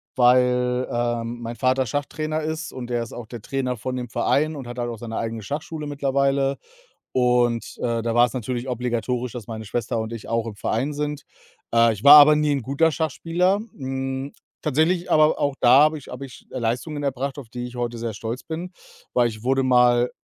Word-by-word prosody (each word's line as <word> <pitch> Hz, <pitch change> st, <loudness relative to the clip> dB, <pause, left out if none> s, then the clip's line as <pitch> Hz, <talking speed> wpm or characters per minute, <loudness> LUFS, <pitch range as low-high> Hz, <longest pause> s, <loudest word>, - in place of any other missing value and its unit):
weil, 125 Hz, 0 st, +3 dB
äh, 120 Hz, -1 st, -1 dB
mein 120 Hz, 0 st, -6 dB
Vater 130 Hz, +1 st, +1 dB
Schachtrainer 155 Hz, +5 st, -2 dB
ist 160 Hz, +2 st, -4 dB
und 125 Hz, -2 st, -7 dB
der 120 Hz, -1 st, 0 dB
ist 115 Hz, -, -10 dB
auch 120 Hz, -, -7 dB
der 120 Hz, -2 st, -8 dB
Trainer 130 Hz, -2 st, -2 dB
von 130 Hz, +4 st, -4 dB
dem 125 Hz, -1 st, -4 dB
Verein 155 Hz, +7 st, +1 dB
und 135 Hz, -4 st, -7 dB
hat 120 Hz, -, -8 dB
halt 120 Hz, -1 st, -2 dB
auch 115 Hz, -, -6 dB
seine 115 Hz, -1 st, -5 dB
eigene 115 Hz, -1 st, -3 dB
Schachschule 150 Hz, -, -5 dB
mittlerweile. 140 Hz, -1 st, +1 dB, 0.6 s
Und, 125 Hz, -2 st, +1 dB
äh, 115 Hz, -1 st, -1 dB
da 115 Hz, 0 st, -1 dB
war's 120 Hz, 0 st, +4 dB
natürlich 125 Hz, +1 st, -4 dB
obligatorisch, 125 Hz, 0 st, -2 dB
dass 120 Hz, -5 st, -7 dB
meine 110 Hz, -1 st, -6 dB
Schwester 115 Hz, +2 st, -2 dB
und 110 Hz, 0 st, -4 dB
ich 115 Hz, -2 st, -8 dB
auch 115 Hz, 0 st, 0 dB
im 110 Hz, -, -5 dB
Verein 130 Hz, +8 st, -1 dB
sind. 150 Hz, 0 st, -3 dB, 0.5 s
Äh, 115 Hz, 0 st, +5 dB
ich 105 Hz, -1 st, -7 dB
war 145 Hz, -, +11 dB
aber 150 Hz, +1 st, +8 dB
nie 150 Hz, -1 st, +2 dB
'n 140 Hz, -2 st, -1 dB
guter 140 Hz, +6 st, +2 dB
Schachspieler. 170 Hz, +5 st, 0 dB, 0.2 s
Hm, 135 Hz, 0 st, -4 dB, 0.3 s
tatsächlich 170 Hz, +5 st, +1 dB
aber 155 Hz, 0 st, +4 dB
auch 140 Hz, -1 st, 0 dB
da 125 Hz, +3 st, +7 dB
habe 155 Hz, +1 st, +3 dB
ich 140 Hz, -, -14 dB
habe 125 Hz, +2 st, -7 dB
ich 130 Hz, -, -15 dB
Leistungen 130 Hz, +5 st, -2 dB
erbracht, 135 Hz, 0 st, -2 dB
auf 130 Hz, -5 st, -9 dB
die 120 Hz, 0 st, -5 dB
ich 125 Hz, 0 st, -10 dB
heute 120 Hz, -1 st, -3 dB
sehr 115 Hz, -1 st, -4 dB
stolz 115 Hz, +4 st, -5 dB
bin, 170 Hz, +3 st, -6 dB, 0.4 s
weil 120 Hz, -1 st, +3 dB
ich 110 Hz, -2 st, -9 dB
wurde 135 Hz, +2 st, +2 dB
mal 125 Hz, -1 st, +4 dB
125 Hz, 200 wpm, -23 LUFS, 120-145 Hz, 0.6 s, war